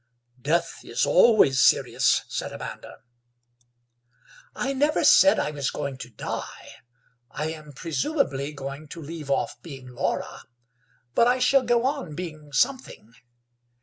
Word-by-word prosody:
"Death 165 +4 0
is - - 0
always 200 - +5
serious," - - +3
said - - -4
Amanda. - - -9 1.5
"I 275 - -2
never 295 +3 +1
said 290 - +6
I 150 - -1
was 140 -2 -2
going 140 -3 -5
to 125 - -8
die. 115 - -7 0.6
I 155 +5 -3
am 155 -2 -10
presumably 145 - -2
going 140 +1 -7
to 165 - -9
leave 155 -1 -8
off 140 - -1
being 135 -6 -10
Laura, 125 - -3 0.7
but 235 - +4
I 250 +1 +3
shall 260 +2 +4
go 240 -1 +1
on 270 - -2
being 155 -4 -8
something. 245 - -1
155 Hz, 130 wpm, -25 LUFS, -, 1.5 s, said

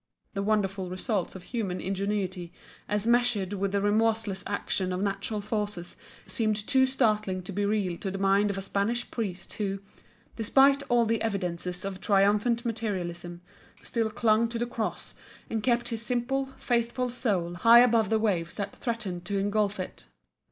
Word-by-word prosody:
The 195 - -2
wonderful 195 -3 0
result 185 0 -2
of 185 - -8
human 195 -5 -3
ingenuity 190 -2 -2 0.4
as 210 0 0
measured 235 -5 +2
with 200 0 -1
the 200 0 +1
remorseless 215 -1 +1
action 190 -2 -1
of 180 +2 -1
natural 200 +1 -2
forces 210 -4 -3 0.3
seemed 215 -3 0
too 260 +5 +3
startling 215 -8 +1
to 180 - -7
be 200 +1 0
real 200 -5 0
to 195 - -3
the 195 - -4
mind 195 +1 +3
of 200 - -2
a 195 - -3
Spanish 200 +5 -1
priest 190 -6 -4
who, 195 -2 -2 0.6
despite 270 +5 +4
all 240 -1 +4
the 225 0 0
evidences 180 -4 -2
of 190 -1 -5
triumphant 210 +4 +3
materialism, 175 -6 -3 0.4
still 225 -2 0
clung 220 +1 +3
to 235 - -3
the 240 - 0
Cross 230 -2 -4 0.4
and 225 -1 0
kept 240 +1 +1
his 230 -2 -3
simple, 250 +4 -1
faithful 240 +1 0
soul 195 -9 0
high 230 +7 +7
above 230 -4 +4
the 220 - +3
waves 185 -6 0
that 200 -1 -4
threatened 210 -7 -4
to 200 +2 -1
engulf 205 0 0
it. 185 - -6
205 Hz, 165 wpm, -28 LUFS, 195-230 Hz, 0.6 s, high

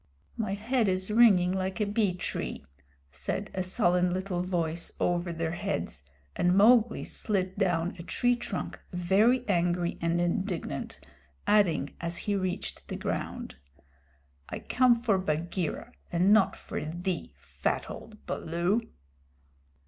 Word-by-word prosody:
"My 215 -3 -1
head 230 +2 +1
is 190 +1 0
ringing 205 -6 +6
like 190 +2 -2
a 210 - +2
bee 205 -3 +1
tree," 180 - -4 0.5
said - - -4
a 185 - -1
sullen 180 -2 +2
little 185 -1 -2
voice 170 -2 -2
over 175 0 +1
their 165 -1 -2
heads, 190 - -3 0.3
and 180 +1 +3
Mowgli 225 +2 +5
slid 190 -3 -2
down 175 -3 +1
a - - -4
tree 245 +7 +1
trunk 220 -5 -5
very 205 +8 +3
angry 175 -2 +1
and 170 +1 +1
indignant, 175 - -2 0.5
adding 170 -9 +3
as 170 0 -3
he 205 - -1
reached 185 -2 -3
the - - -4
ground: - - -4 0.9
"I - - -4
come 250 -2 +3
for 220 -5 +2
Bagheera 170 0 -2 0.2
and 180 +4 +4
not 215 -3 +4
for - - -5
thee, 175 +3 -4
fat - - -2
old 215 -1 -10
Baloo!" 175 +7 0
185 Hz, 135 wpm, -29 LUFS, 175-210 Hz, 0.9 s, ringing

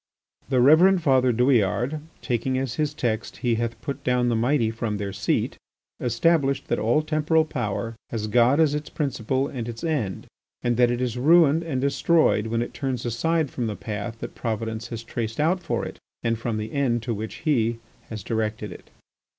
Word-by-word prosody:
The 130 -2 +2
Reverend 170 +7 +6
Father 130 -4 +4
Douillard, 125 +3 +2 0.2
taking 130 +1 0
as 130 -2 -2
his 150 +2 0
text, 115 -6 -2
"He 120 - +3
hath 115 0 -3
put 140 -2 -5
down 125 -1 +2
the 120 - +1
mighty 120 0 +2
from 115 -2 -3
their 100 -1 -4
seat," - - -1 0.4
established 135 +3 +1
that - - +1
all 120 +8 +2
temporal 155 +1 +2
power 115 -5 -3
has 110 -2 -3
God 120 +6 +4
as 155 -3 +4
its 150 0 -3
principle 135 -2 -1
and 120 -4 -5
its 115 +6 -7
end, 135 - -2 0.4
and 120 -1 +1
that 125 -1 +5
it 120 +1 -1
is 125 -1 -2
ruined 160 +2 +5
and 160 -6 -2
destroyed 140 -4 +2
when 115 +1 0
it - - -8
turns 130 -3 -3
aside 155 +6 0
from 120 -3 -2
the 105 - -3
path 105 +3 -5
that - - -6
Providence 110 -1 -3
has 115 -1 -6
traced 115 0 -4
out 170 +5 +2
for - - -2
it - - -8 0.2
and 115 0 +1
from 115 -1 -2
the 110 +1 -4
end 120 -5 +1
to 120 0 -2
which 110 +1 -6
He 115 -6 +2 0.3
has 110 -4 -6
directed 110 -2 -2
it. - - -12
120 Hz, 190 wpm, -24 LUFS, 115-145 Hz, 0.4 s, Reverend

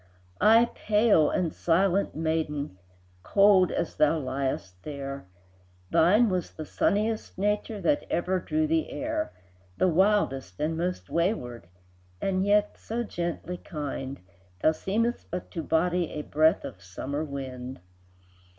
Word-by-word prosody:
Ay, 225 +3 +6
pale 210 -7 +3
and 170 -3 0
silent 190 +3 +1
maiden, 155 -6 -2 0.5
Cold 195 - +5
as 170 - -2
thou 155 +2 +4
liest 130 -8 -2
there, 140 -5 -6 0.6
Thine 210 +8 +5
was 185 -4 -1
the 155 - -7
sunniest 215 +7 0
nature 210 +2 -1
That 170 -6 +1
ever 185 +2 0
drew 310 - 0
the 320 0 0
air, 315 +2 -3 0.5
The - - +3
wildest 170 - +1
and 155 +2 0
most 180 +2 -3
wayward, 125 - -1 0.5
And 190 - 0
yet 205 +1 +2
so 235 +2 -3
gently 175 -3 -4
kind, 140 -5 -5 0.4
Thou 155 - +6
seemedst 225 +9 -1
but 180 +1 -5
to 165 - -3
body 175 +1 +1
A 150 - -4
breath 155 +5 +2
of 90 - -8
summer 130 +11 -4
wind. 130 -3 -6
170 Hz, 130 wpm, -27 LUFS, 145-205 Hz, 0.6 s, Ay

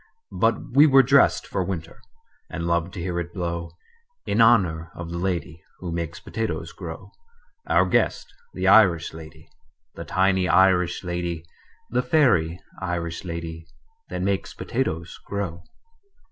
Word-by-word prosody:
But 115 0 0
we 145 +4 +7
were 135 -2 +7
dressed 140 +2 +4
for 95 - -2
winter, 85 -3 -5 0.5
And 85 - -4
loved 85 +1 0
to - - -5
hear 85 0 -2
it 85 +2 -6
blow 85 -2 -3 0.6
In - - +1
honor 90 -8 +4
of 85 0 -7
the 85 - -3
lady 85 -3 -3 0.2
Who 90 -2 -6
makes 85 -1 -4
potatoes 115 0 -4
grow - - -9 0.6
Our - - +4
guest, - - 0 0.2
the - - -1
Irish 90 -7 +5
lady, 80 0 -12 0.5
The - - -7
tiny 95 -1 +2
Irish 90 -2 +3
lady, 85 -2 -3 0.5
The 125 +1 +2
fairy 115 - +2 0.2
Irish 85 -2 -3
lady 85 -1 -6 0.4
That - - -3
makes 100 0 -1
potatoes 85 +2 -3
grow. 95 -4 -4
85 Hz, 140 wpm, -24 LUFS, 85-95 Hz, 0.6 s, we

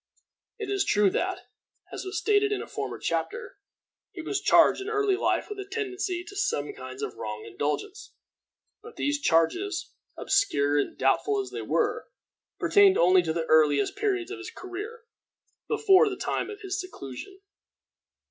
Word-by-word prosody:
It 420 -3 -4
is 395 -1 +2
true 205 - +3
that, 375 - -1 0.5
as - - -5
was 380 +2 -4
stated 415 -1 +2
in 410 - 0
a - - -5
former - - -5
chapter, 470 -1 -3 0.5
he 360 -6 -8
was 400 - -2
charged - - +5
in 390 - -4
early 415 -3 +2
life 385 - 0
with 420 -1 -7
a 395 - -5
tendency 380 -3 -3
to 400 +2 -12
some 415 -1 -1
kinds 415 0 -8
of 420 -1 -3
wrong 445 -1 -6
indulgence; 415 +1 -4 0.7
but 455 +1 -12
these 290 0 0
charges, 330 - +1 0.3
obscure 145 - +2
and - - -2
doubtful 415 0 +2
as 395 - -4
they - - -5
were, - - 0 0.5
pertained 405 -2 +5
only 180 +2 +5
to 165 -2 -2
the 165 0 -2
earliest 150 - +3
periods 390 -3 -1
of - - -6
his - - -7
career, 415 +5 -8 0.6
before 430 -1 +5
the 380 - -5
time - - -2
of 420 0 -8
his 385 0 -3
seclusion. 365 - -9
390 Hz, 165 wpm, -27 LUFS, 350-415 Hz, 0.7 s, charged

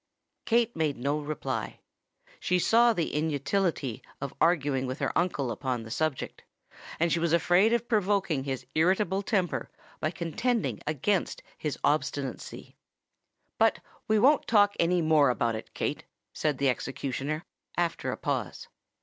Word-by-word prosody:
Kate 235 0 +2
made 155 -3 0
no 140 +5 0
reply: 150 0 -4 0.6
she 180 - +1
saw 235 +6 +5
the 175 -8 -2
inutility 150 - -1 0.2
of 140 -1 -5
arguing 145 -6 +2
with 130 +1 -4
her - - -2
uncle 145 -8 0
upon 125 -1 -2
the 110 - -10
subject; 155 0 -2 0.6
and 170 +1 +2
she 170 - +2
was 165 -1 +1
afraid 175 +5 +4
of 235 0 +1
provoking 200 - +1
his 130 -2 -4
irritable 190 +4 +2
temper 190 -4 -1 0.3
by 155 - 0
contending 170 - -1
against 165 +6 0
his 150 -2 -3
obstinacy. 140 -3 -2 0.8
"But - - +4 0.3
we 215 - +3
won't 270 +7 +4
talk 205 -2 +5
any 170 0 +2
more 155 -3 +5
about 120 -2 +1
it, 110 - -8
Kate," - - -2 0.3
said 150 -3 0
the 140 0 +2
executioner, 135 +4 -3 0.3
after 175 -1 0
a - - -4
pause. - - -3
160 Hz, 140 wpm, -28 LUFS, 140-190 Hz, 0.8 s, saw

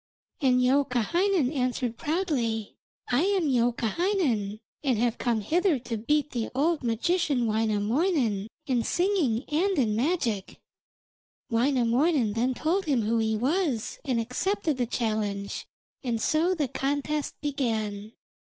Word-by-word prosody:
And 255 -2 +4
Youkahainen 280 - +2
answered 250 -3 -1
proudly: 255 - -1 0.3
'I 245 +3 +3
am 385 -4 +2
Youkahainen, 240 - 0 0.2
and 260 -5 +2
have 235 +1 0
come 235 -3 0
hither 335 - +2
to 240 -1 -5
beat 295 +7 0
the 235 -2 -2
old 315 +4 +1
magician 255 +3 +1
Wainamoinen 220 - +1 0.2
in 250 -3 +1
singing 345 - +1
and 360 +6 +1
in 220 -6 +2
magic.' 235 - -1 0.9
Wainamoinen 245 +1 +2
then 245 +3 0
told 360 +8 0
him 270 -7 +1
who 225 +2 +1
he 220 -1 +1
was, 270 - -1
and 255 -4 0
accepted 305 - -1
the 245 -2 0
challenge, 215 -4 -2 0.4
and 235 -3 -1
so 325 +9 +2
the 300 -5 0
contest 285 +3 -2
began. 220 -7 -2
250 Hz, 125 wpm, -27 LUFS, 225-310 Hz, 0.9 s, And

